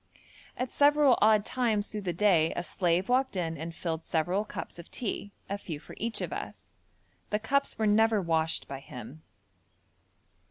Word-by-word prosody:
At 255 0 -2
several 290 -2 +5
odd 215 -1 +5
times 225 -5 0
through 210 - -4
the 185 -3 -2
day 170 -3 +3
a 175 - -2
slave 175 +2 0
walked 260 -1 +2
in 165 -3 -1
and 165 +3 -5
filled 165 -2 -3
several 175 +6 0
cups 195 - -6
of 170 - -11
tea, 205 -4 -4 0.2
a 200 +1 -3
few 160 -7 -6
for - - -12
each 230 +1 -1
of - - -3
us. - - -7 0.6
The 210 - +1
cups 280 +6 0
were 220 - +1
never 220 +1 +4
washed 160 -3 0
by 135 - -6
him. 125 +3 -10
200 Hz, 170 wpm, -29 LUFS, 165-225 Hz, 0.6 s, several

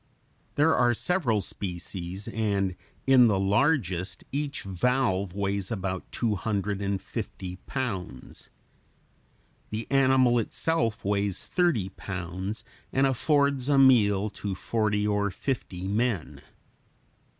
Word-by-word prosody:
There 160 +2 +4
are 120 -1 +3
several 130 - +1
species, 90 +1 -5
and 100 -5 0 0.3
in 130 -2 +7
the 105 -3 +2
largest 95 - +1
each 145 0 -3
valve 100 -1 0
weighs 100 -1 -1
about 95 -4 -4
two 115 -3 0
hundred 100 0 -2
and 100 -1 -1
fifty 95 -2 -6
pounds. 95 - -5 1.2
The 110 +1 -4
animal 130 -3 +4
itself 115 -2 -1
weighs 100 -1 0
thirty 170 - +1
pounds, 95 +3 -5 0.3
and 135 +1 +3
affords 140 0 +2
a 140 - +4
meal 105 -6 +5
to 100 -2 -2
forty 105 +1 0
or 105 -1 +1
fifty 95 -4 -4
men. 105 -3 -1
105 Hz, 110 wpm, -27 LUFS, 95-130 Hz, 1.2 s, in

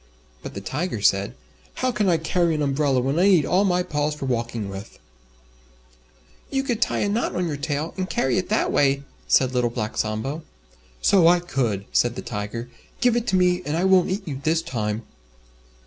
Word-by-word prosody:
But - - -8
the 100 - -5
Tiger 145 - -3
said, 100 +3 +2 0.4
"How 255 0 0
can 210 -4 +1
I 170 - +4
carry 170 +1 +1
an 150 - 0
umbrella 140 -2 +1
when 135 +6 0
I 190 - +5
need 180 -7 +5
all 185 +3 +3
my 180 -2 +2
paws 150 -3 -1
for 145 - -5
walking 115 -4 -2
with?" 95 +1 -8 1.5
"You 270 0 0
could 240 -4 -2
tie - - +1
a - - +1
knot 215 +4 -1
on 180 - 0
your 155 - -2
tail, 145 +2 -3
and 185 0 -2
carry 135 +7 +1
it 185 - -5
that 215 - +1
way," 140 0 +2 0.2
said 130 -1 +3
Little 125 -1 +1
Black 110 -2 -4
Sambo. 110 +9 -2 0.6
"So 185 -4 +5
I 175 +1 +6
could," 120 - -2
said 120 0 +2
the - - -6
Tiger. 105 +2 -5 0.3
"Give 245 -2 +3
it 240 -1 -1
to - - +1
me 180 -1 +3
and 150 0 -2
I 175 - 0
won't 190 -2 +4
eat 195 +1 -3
you 135 -3 -5
this 160 +1 +1
time." 110 -2 -3
150 Hz, 200 wpm, -23 LUFS, 120-180 Hz, 1.5 s, I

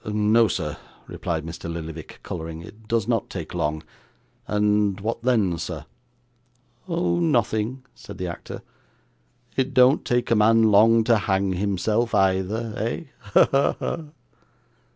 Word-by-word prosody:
'No, 105 +1 +3
sir,' 75 -6 -3 0.3
replied 80 -2 -4
Mr. 85 0 -6
Lillyvick, 80 -1 -8
colouring. 80 -1 -6
'It 105 +5 -14
does 115 -2 0
not 115 -3 0
take 85 -5 -6
long. 80 -2 -2 0.6
And 105 -1 +1
what 115 +3 -3
then, 110 -9 +1
sir?' - - -5 1.0
'Oh! 175 0 0
nothing,' 125 -5 0
said - - -11
the 90 - -4
actor. 85 -1 -7 0.9
'It 135 0 -1
don't 130 +3 +5
take 120 -1 0
a - - +5
man 115 +1 +5
long 115 +2 +6
to 115 +1 +4
hang 95 -1 0
himself, 105 +5 0
either, 95 +4 +1
eh? 115 +9 -2 0.2
ha, 100 0 +3 0.3
ha! - - -2
105 Hz, 130 wpm, -24 LUFS, 90-115 Hz, 1.0 s, long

